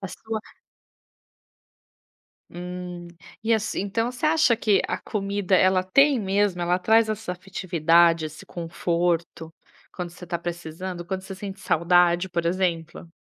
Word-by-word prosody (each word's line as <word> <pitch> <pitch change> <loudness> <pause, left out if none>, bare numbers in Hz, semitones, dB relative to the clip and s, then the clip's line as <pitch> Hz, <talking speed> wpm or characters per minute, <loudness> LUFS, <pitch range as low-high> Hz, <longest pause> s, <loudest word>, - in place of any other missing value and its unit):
a 195 - -5
sua 220 +1 -5 2.1
Hum, 180 0 -7 0.4
e 230 +1 +3
assim 220 -2 -1
então 225 +4 -1
você 250 +4 -4
acha 310 -6 +4
que 210 -3 +3
a - - -2
comida, 200 -2 -1
ela 185 0 +4
tem 275 +7 +4
mesmo, 195 -2 +1
ela 175 +1 +1
traz 220 +4 +4
essa 215 -3 -3
afetividade, 170 -3 +2
esse 155 0 -9
conforto, 170 -1 -2 0.4
quando 180 -2 -5
você 175 +1 -14
está 175 -1 -3
precisando, 175 +1 -6
quando 190 0 -3
você 190 0 -8
sente 195 0 -7
saudade, 175 +1 +3
por 170 -1 -2
exemplo? 170 -2 -2
180 Hz, 135 wpm, -24 LUFS, 175-205 Hz, 2.1 s, acha